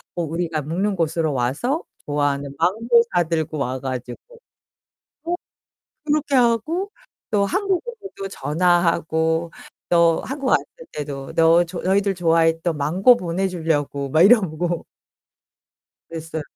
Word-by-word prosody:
어 175 Hz, -, -1 dB
우리가 165 Hz, -1 st, -2 dB
묵는 190 Hz, +7 st, -1 dB
곳으로 165 Hz, -2 st, 0 dB
와서 140 Hz, -, -1 dB, 0.2 s
좋아하는 145 Hz, -1 st, -1 dB
망고 230 Hz, -, +3 dB
사들고 160 Hz, -3 st, 0 dB
와 130 Hz, -1 st, -2 dB
가지고. 125 Hz, -2 st, -5 dB, 1.1 s
어 340 Hz, +1 st, -1 dB, 0.7 s
그렇게 295 Hz, -2 st, 0 dB
하고 265 Hz, -, +1 dB, 0.4 s
또 205 Hz, -2 st, +2 dB
한국으로도 390 Hz, -, -3 dB
전화하고 165 Hz, +1 st, +1 dB, 0.4 s
또 170 Hz, -1 st, +4 dB
한국 275 Hz, 0 st, -4 dB
왔을 -, -, +3 dB, 0.3 s
때도 140 Hz, -2 st, -6 dB
"너 165 Hz, +1 st, +5 dB, 0.2 s
너희들 195 Hz, +1 st, +1 dB
좋아했던 165 Hz, -1 st, +2 dB
망고 185 Hz, -, +4 dB
보내 185 Hz, 0 st, -2 dB
주려고." 155 Hz, -5 st, -1 dB
막 155 Hz, -, +4 dB
이러고 175 Hz, -5 st, +3 dB, 1.2 s
그랬어요. 160 Hz, -1 st, -6 dB
170 Hz, 255 characters per minute, -22 LUFS, 155-200 Hz, 1.2 s, 너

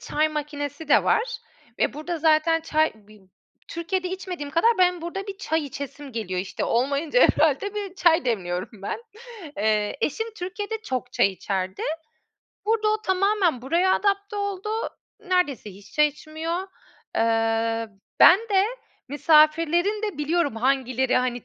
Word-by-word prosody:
çay 310 Hz, +1 st, 0 dB
makinesi 295 Hz, 0 st, -5 dB
de -, -, +5 dB
var 455 Hz, +3 st, +1 dB, 0.4 s
ve -, -, +1 dB
burada 320 Hz, +4 st, -4 dB
zaten 320 Hz, +1 st, +3 dB
çay 315 Hz, 0 st, +1 dB
bi 215 Hz, -1 st, -19 dB, 0.5 s
Türkiye'de 365 Hz, +2 st, -2 dB
içmediğim 365 Hz, -6 st, -5 dB
kadar 335 Hz, +10 st, +4 dB
benim 360 Hz, -2 st, +3 dB
burada 390 Hz, +4 st, -5 dB
bir 395 Hz, -, -6 dB
çay 320 Hz, -5 st, -1 dB
içesim 280 Hz, 0 st, -8 dB
geliyor. 185 Hz, -5 st, -3 dB
İşte, 190 Hz, -, -4 dB
olmayınca 280 Hz, -, +1 dB
herhâlde 320 Hz, +7 st, +3 dB
bir 400 Hz, -3 st, -5 dB
çay 325 Hz, -6 st, +3 dB
demliyorum 180 Hz, -6 st, -2 dB
ben. 330 Hz, -, -4 dB, 0.5 s
Eee, 210 Hz, 0 st, +1 dB
eşim 445 Hz, +9 st, -1 dB
Türkiye'de 415 Hz, +4 st, -4 dB
çok 255 Hz, -, -4 dB
çay -, -, +4 dB
içerdi. 190 Hz, 0 st, -3 dB, 0.8 s
Burada 435 Hz, -1 st, +2 dB
o 430 Hz, 0 st, 0 dB
tamamen 375 Hz, -, +1 dB
buraya 345 Hz, +7 st, +2 dB
adapte 400 Hz, 0 st, 0 dB
oldu. 405 Hz, 0 st, -3 dB, 0.5 s
Neredeyse 360 Hz, -, 0 dB
hiç 195 Hz, +1 st, -15 dB
çay 300 Hz, 0 st, +4 dB
içmiyor. 320 Hz, +5 st, -5 dB, 0.5 s
Eee, 225 Hz, 0 st, +1 dB, 0.3 s
ben 365 Hz, -, +9 dB
de 390 Hz, -1 st, +4 dB, 0.4 s
misafirlerin 325 Hz, -, +3 dB
de 415 Hz, -9 st, -3 dB
biliyorum 295 Hz, -4 st, 0 dB
hangileri, 260 Hz, 0 st, +1 dB
hani, 245 Hz, -2 st, -1 dB
310 Hz, 135 wpm, -24 LUFS, 255-375 Hz, 0.8 s, ben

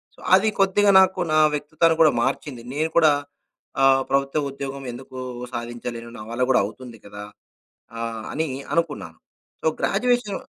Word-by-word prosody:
So, -, -, -21 dB, 0.2 s
అది 215 Hz, +3 st, +3 dB
కొద్దిగా 200 Hz, +1 st, +4 dB
నాకు 190 Hz, 0 st, +1 dB
నా -, -, +4 dB, 0.2 s
వ్యక్తిత్వాన్ని 155 Hz, +3 st, +1 dB
కూడా 155 Hz, -, +6 dB
మార్చింది. 130 Hz, -2 st, -3 dB
నేను 155 Hz, +3 st, -1 dB
కూడా 155 Hz, -3 st, +6 dB, 0.7 s
ఆహ్, 135 Hz, 0 st, +5 dB
ప్రభుత్వ 140 Hz, +2 st, 0 dB
ఉద్యోగం 135 Hz, 0 st, -6 dB
ఎందుకు 130 Hz, +1 st, -11 dB, 0.4 s
సాధించలేను? 120 Hz, 0 st, -6 dB
నా 110 Hz, -, -9 dB
వల్ల 125 Hz, +2 st, 0 dB
గూడా 125 Hz, -, +4 dB
అవుతుంది 115 Hz, +2 st, -10 dB
కదా! 105 Hz, 0 st, -9 dB, 0.8 s
ఆ! -, -, -5 dB, 0.3 s
అని 160 Hz, +1 st, -1 dB, 0.3 s
అనుకున్నాను. 145 Hz, -, -2 dB, 0.4 s
So, -, -, -5 dB
graduation 240 Hz, -1 st, 0 dB
140 Hz, 140 wpm, -23 LUFS, 120-170 Hz, 0.8 s, కూడా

